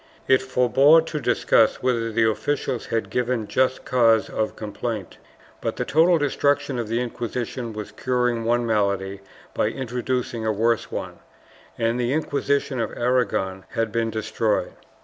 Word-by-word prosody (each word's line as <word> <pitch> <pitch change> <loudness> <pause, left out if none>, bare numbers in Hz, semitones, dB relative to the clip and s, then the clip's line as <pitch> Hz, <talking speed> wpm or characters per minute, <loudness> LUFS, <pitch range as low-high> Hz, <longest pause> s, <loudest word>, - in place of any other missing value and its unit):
It 130 0 +5
forebore 130 +5 +4
to 155 -2 -4
discuss 120 -3 +2
whether 115 -3 0
the 110 0 +3
officials 115 +3 -2
had 115 -1 -2
given 125 -3 -1
just 130 0 0
cause 115 -3 +3
of 110 - -2
complaint, 105 -1 -5 0.4
but - - -2
the - - -2
total 165 +3 +4
destruction 145 -2 0
of 115 - -3
the 115 +2 -1
Inquisition 120 0 -4
was 105 -1 -7
curing 125 0 0
one 120 +1 +1
malady 100 -3 0 0.3
by - - +1
introducing 125 -1 -3
a 110 - +1
worse 115 +1 0
one, - - -5 0.6
and 115 +1 0
the 120 +1 0
Inquisition 140 -3 0
of 115 - -1
Aragon 120 -6 0
had 115 -1 0
been 115 0 0
destroyed. 110 0 -1
120 Hz, 150 wpm, -23 LUFS, 110-130 Hz, 0.6 s, It